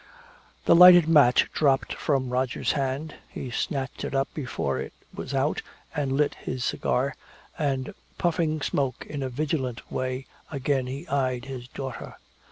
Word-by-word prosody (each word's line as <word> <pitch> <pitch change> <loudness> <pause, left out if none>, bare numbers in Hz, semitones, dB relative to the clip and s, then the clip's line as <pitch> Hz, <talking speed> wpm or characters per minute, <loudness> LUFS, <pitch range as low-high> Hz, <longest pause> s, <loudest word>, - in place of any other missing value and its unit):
The - - +6
lighted 175 -1 +9
match 145 -6 +5
dropped 135 -3 +2
from 135 -4 0
Roger's 125 0 0
hand. 140 +2 -2
He 125 - -6
snatched 135 +1 -3
it - - -3
up 135 0 0
before 140 -5 -2
it - - -6 0.2
was - - -6
out 135 +3 +1 0.3
and 140 -3 0
lit 145 +1 +2
his 125 -1 -4
cigar, 135 +2 0 0.4
and 135 -4 -1 0.2
puffing 160 -3 0
smoke 135 -4 -1
in 145 -2 -5
a 130 - -2
vigilant 130 -2 -3
way 130 +1 -2 0.3
again 135 -2 0
he 140 +6 -6
eyed 130 -4 0
his 130 -3 -7
daughter. 130 0 -7
135 Hz, 150 wpm, -26 LUFS, 130-150 Hz, 0.4 s, lighted